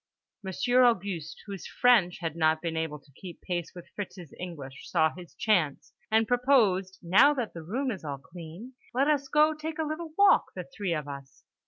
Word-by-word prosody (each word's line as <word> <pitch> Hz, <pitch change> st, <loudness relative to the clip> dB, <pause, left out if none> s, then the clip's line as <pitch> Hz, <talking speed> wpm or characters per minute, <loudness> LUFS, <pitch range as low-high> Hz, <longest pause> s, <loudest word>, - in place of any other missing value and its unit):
Monsieur 245 Hz, +6 st, +1 dB
Auguste, 200 Hz, -9 st, 0 dB
whose 200 Hz, -3 st, -7 dB
French 225 Hz, -8 st, +3 dB
had 165 Hz, -2 st, -3 dB
not 160 Hz, -1 st, +2 dB
been 165 Hz, 0 st, -3 dB
able 160 Hz, -2 st, -2 dB
to 140 Hz, 0 st, -23 dB
keep 175 Hz, +5 st, -11 dB
pace 175 Hz, -2 st, -3 dB
with 175 Hz, -, -10 dB
Fritz's 180 Hz, -6 st, -7 dB
English, 145 Hz, -7 st, -8 dB
saw 160 Hz, -3 st, +2 dB
his 180 Hz, -1 st, -12 dB
chance, 175 Hz, -10 st, 0 dB, 0.2 s
and 220 Hz, 0 st, +3 dB
proposed 225 Hz, -8 st, +2 dB
"now 200 Hz, +12 st, +5 dB
that 245 Hz, -5 st, -3 dB
the 165 Hz, -, -7 dB
Room 250 Hz, -, -2 dB
is 195 Hz, -6 st, -7 dB
all 145 Hz, -2 st, -4 dB
clean, 175 Hz, -, -11 dB, 0.2 s
let 270 Hz, +3 st, +3 dB
us 290 Hz, -2 st, +1 dB
go 300 Hz, +3 st, +4 dB
take 310 Hz, +1 st, -6 dB
a 320 Hz, -, 0 dB
little 315 Hz, +2 st, -5 dB
walk, 400 Hz, -1 st, +5 dB
the -, -, -4 dB
three 190 Hz, -5 st, -1 dB
of 150 Hz, -2 st, -4 dB
us." 140 Hz, -1 st, -10 dB
185 Hz, 190 wpm, -28 LUFS, 160-245 Hz, 0.2 s, now